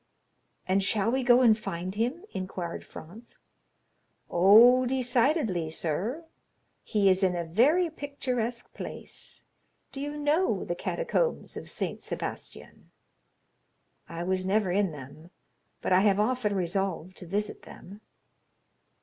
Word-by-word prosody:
"And 190 +1 +2
shall 210 +3 +1
we 265 +1 +1
go 245 0 +5
and 230 -4 +6
find 185 -4 -5
him?" 245 - -2
inquired 185 -2 -5
Franz. 215 +9 -12 0.9
"Oh, 230 +8 +7
decidedly, 245 - +1
sir. 190 - -3 0.6
He 205 -2 +1
is 185 0 +4
in 185 -1 +2
a 170 - -2
very 275 - +3
picturesque 250 -6 -4
place—do 275 - -10
you 290 +1 -4
know 295 +5 +1
the - - -2
catacombs - - -1
of - - -6
St. - - -4
Sebastian?" - - -7 1.2
"I 170 +1 -5
was 185 +1 -1
never 195 0 +1
in 195 -1 +1
them; 150 +3 -11 0.5
but - - +1
I 185 - +6
have 200 0 +3
often 215 -2 0
resolved 185 -1 -2
to 180 - -10
visit 205 +4 -3
them." 200 +4 -13
210 Hz, 125 wpm, -28 LUFS, 185-255 Hz, 1.2 s, Oh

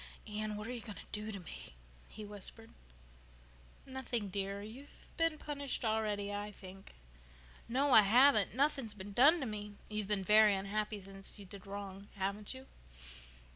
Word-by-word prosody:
"Anne, 215 0 -3
what 210 0 -5
are 240 - -4
you 240 - -5
going 215 -3 -8
to - - -10
do 210 +1 -3
to 200 - -5
me?" 160 - -10 0.3
he 215 0 -8
whispered. 205 +2 -4 1.1
"Nothing, 255 -5 -3
dear. 200 +1 -3
You've 250 +7 -11
been 330 -1 +2
punished 285 -5 -3
already, 210 -2 0
I 205 +1 -3
think." 195 - -12 0.7
"No, 270 +4 +2
I 220 - +11
haven't. 220 0 +5
Nothing's 270 -5 +1
been 200 0 -8
done 290 - +7
to - - -1
me." 210 -2 -5
"You've 210 -2 -2
been 205 -2 +2
very 210 0 +7
unhappy 210 +2 -2
ever 195 - -12
since 195 +2 -3
you 200 - -10
did 195 +1 -11
wrong, 200 0 -7
haven't 200 +1 -2
you?" 260 0 -10
210 Hz, 170 wpm, -35 LUFS, 200-235 Hz, 1.1 s, I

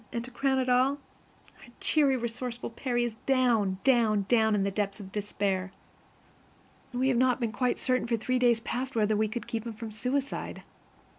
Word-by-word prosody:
And, 235 0 -3
to 255 - -11
crown 265 0 +1
all, 255 +3 +3 0.6
our - - -15
cheery, 280 -4 +3
resourceful 240 0 -4
Percy 240 0 -1
is 240 -2 -2
down, 235 -8 +2
down, 225 -6 +3
down 220 -2 +3
in 200 - +1
the 200 - 0
depths 200 +1 -2
of 190 -2 -9
despair. 195 -2 -2 1.2
We 255 +1 +1
have 250 - +2
not 255 0 +3
been 230 -3 -1
quite 250 +1 0
certain 255 -2 0
for 230 -1 +1
three 255 +3 0
days 240 -2 +3
past 255 +3 -3
whether 215 -1 +2
we 215 +1 +2
could 225 +1 -5
keep 225 -2 -3
him 230 - -5
from 220 0 -7
suicide. 255 +6 -3
235 Hz, 180 wpm, -29 LUFS, 215-255 Hz, 1.2 s, all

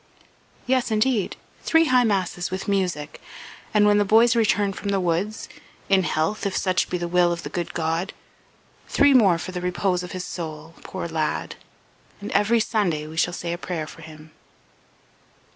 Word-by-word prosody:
"Yes 255 -1 +1
indeed. 220 -1 +1 0.3
Three 325 0 +3
high 255 -4 +4
masses 185 -4 -1
with 185 +1 -5
music, 180 -7 -2 0.5
and 210 -1 +4
when 205 0 +4
the - - +4
boys 225 +4 +5
return 205 -3 +2
from 200 - -5
the 200 -1 +1
woods 185 +5 -1 0.4
in 195 -1 +5
health, 170 +4 -1
if 195 - -2
such 185 -1 +1
be 180 - -1
the 175 0 -3
will 175 0 +3
of 170 -1 -4
the - - -6
good 175 -2 -4
God 165 +3 -1 0.8
three 285 0 +4
more 200 -9 +5
for 175 - -6
the 180 -1 -5
repose 180 0 0
of 180 - -8
his 185 -1 -4
soul, 160 -2 -7
poor 185 -2 -5
lad! 160 -2 -2 0.6
And 205 - -7
every 230 +3 +3
Sunday 195 -9 0
we 155 +1 -9
shall, 170 +2 +1
say 170 -1 -4
a 175 - -5
prayer 170 -4 -4
for 165 - -12
him." 155 -1 -13
185 Hz, 175 wpm, -23 LUFS, 170-210 Hz, 0.8 s, boys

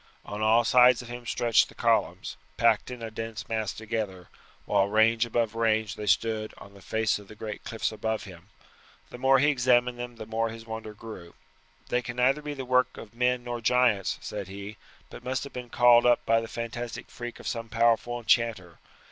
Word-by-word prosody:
On 105 +1 -6
all 110 +2 +4
sides 125 0 +5
of 120 - -12
him 120 0 -8
stretched 120 -2 +3
the - - -16
columns, - - 0 0.2
packed - - +3
in 125 -2 -7
a 110 - -5
dense 115 0 -6
mass 110 -3 -1
together, 105 -5 -5 0.4
while 95 - +2
range 110 +2 +3
above 115 -1 0
range 110 -2 +1
they 105 - -7
stood 110 +1 0
on 100 - -13
the 100 - -15
face 110 +1 0
of 100 - -14
the 110 - -12
great 105 -1 -7
cliffs 110 -1 -2
above 110 0 -3
him. 95 -1 -13 0.6
The 125 - -9
more 135 +1 +5
he 145 +3 +4
examined 125 -2 +2
them 120 0 -6
the 110 -1 -8
more 115 +1 -1
his 115 0 -9
wonder 110 -1 -7
grew. 105 -6 -10 0.5
"They 125 - +1
can 120 0 -6
neither 130 +4 +2
be 150 -1 -5
the 135 -1 -6
work 125 0 +2
of 110 - -10
men 125 +1 +1
nor 120 -1 -5
giants," 120 -4 +2
he - - -19
said, 100 +1 -6 0.4
"but - - -10
must 130 +1 -2
have 140 - -9
been 125 -1 -7
called 120 0 +5
up 120 - +3
by 115 0 +3
the 115 - -6
fantastic 115 0 -6
freak 120 0 -7
of - - -8
some 115 -1 -4
powerful 115 +1 +2
enchanter. 110 -7 0
115 Hz, 205 wpm, -27 LUFS, 110-120 Hz, 0.6 s, sides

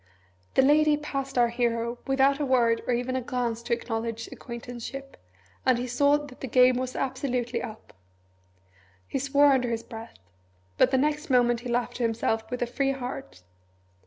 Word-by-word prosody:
The 265 - +6
Lady 300 +2 +5
passed 275 -3 -4
our 240 -1 +4
hero 235 0 -1
without 270 +1 +3
a 290 - 0
word 235 -3 +3
or 250 - +2
even 250 +2 -2
a 260 - 0
glance 240 -2 -2
to 235 - -2
acknowledge 230 -1 -3
acquaintanceship, 245 +3 -8 0.5
and 255 -2 +3
he 245 - -2
saw 285 +4 +3
that 290 -3 -10
the 265 - -3
game 250 +1 +5
was 255 0 -3
absolutely 255 -3 -2
up. 215 - -9 1.1
He - - -2
swore 280 +1 +4
under 250 -2 +1
his 230 -1 -2
breath. 230 -1 -10 0.6
But - - +6
the 265 - +2
next 300 +2 0
moment 240 -2 +3
he 245 +1 -7
laughed 240 0 -1
to - - -6
himself 225 -1 0
with 250 -1 -2
a - - +1
free 275 +3 0
heart. 245 - -7
250 Hz, 175 wpm, -27 LUFS, 235-270 Hz, 1.1 s, The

